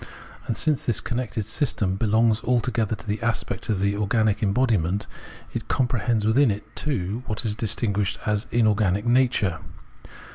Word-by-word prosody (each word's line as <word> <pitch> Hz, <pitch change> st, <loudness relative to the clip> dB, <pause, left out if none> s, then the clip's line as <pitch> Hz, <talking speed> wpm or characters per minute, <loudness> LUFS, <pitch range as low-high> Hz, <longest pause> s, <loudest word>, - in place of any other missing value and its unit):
And 115 Hz, -, -1 dB
since 155 Hz, -4 st, +1 dB
this 120 Hz, -, +2 dB
connected 120 Hz, -3 st, -3 dB
system 105 Hz, -, 0 dB
belongs 110 Hz, +1 st, +2 dB
altogether 120 Hz, -3 st, 0 dB
to 105 Hz, -, -14 dB
the 105 Hz, 0 st, -3 dB
aspect 115 Hz, -4 st, -2 dB
of 105 Hz, -4 st, +1 dB
the 100 Hz, +1 st, +1 dB
organic 105 Hz, 0 st, +1 dB
embodiment, 105 Hz, -4 st, +1 dB, 0.5 s
it -, -, -4 dB
comprehends 120 Hz, -3 st, 0 dB
within 125 Hz, +5 st, +4 dB
it 105 Hz, +2 st, -5 dB
too 115 Hz, -6 st, -2 dB
what 110 Hz, +2 st, -3 dB
is 105 Hz, -, +1 dB
distinguished 105 Hz, -2 st, -1 dB
as 105 Hz, 0 st, -1 dB
inorganic 105 Hz, -3 st, +2 dB
nature. 120 Hz, -8 st, +2 dB
110 Hz, 145 wpm, -24 LUFS, 105-120 Hz, 0.5 s, within